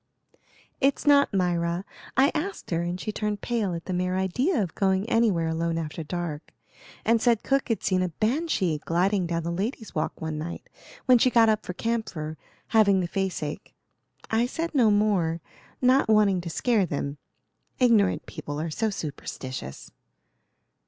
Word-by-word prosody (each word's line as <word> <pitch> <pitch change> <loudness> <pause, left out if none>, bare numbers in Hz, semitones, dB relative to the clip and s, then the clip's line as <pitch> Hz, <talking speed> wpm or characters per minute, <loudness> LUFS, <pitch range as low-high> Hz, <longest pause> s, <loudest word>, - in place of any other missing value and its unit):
"It's 280 +2 +1
not 285 -1 +5
Myra; 175 -1 0 0.3
I 270 +2 +5
asked 350 - -4
her, 165 0 +1
and 175 +1 -3
she 215 - -3
turned 210 -1 -3
pale 220 -7 -1
at 165 - -7
the 185 - -3
mere 180 +1 0
idea 250 - +1
of 185 -6 -2
going 190 +1 +1
anywhere 220 -8 +2
alone 165 +1 -1
after 160 0 -4
dark, 165 -1 -5 0.5
and 230 0 +3
said 235 -3 +3
cook 275 0 +1
had 225 - -1
seen 185 -1 +2
a 185 - 0
banshee 215 - 0
gliding 180 +2 +1
down 165 -1 -2
the 170 - -2
Lady's 215 +5 -3
Walk 155 - -2
one 160 -1 -4
night, 170 +2 -6 0.4
when 250 -2 +6
she 255 - +4
got 230 -2 +5
up 215 -1 +1
for 180 - -3
camphor, 180 -8 -3 0.3
having 200 -4 +4
the 180 - -1
face 190 -2 -2
ache. 145 0 -6 0.6
I 225 +2 +2
said 330 +6 -3
no 245 -6 +4
more, 200 -6 +2 0.4
not 255 -1 +4
wanting 205 -4 +4
to 170 - -6
scare 210 +2 +1
them; 140 -1 -3 0.6
ignorant 230 -6 +3
people 145 -2 -6
are 160 +1 -3
so 220 +8 0
superstitious." 130 - -6
190 Hz, 165 wpm, -26 LUFS, 170-230 Hz, 0.6 s, when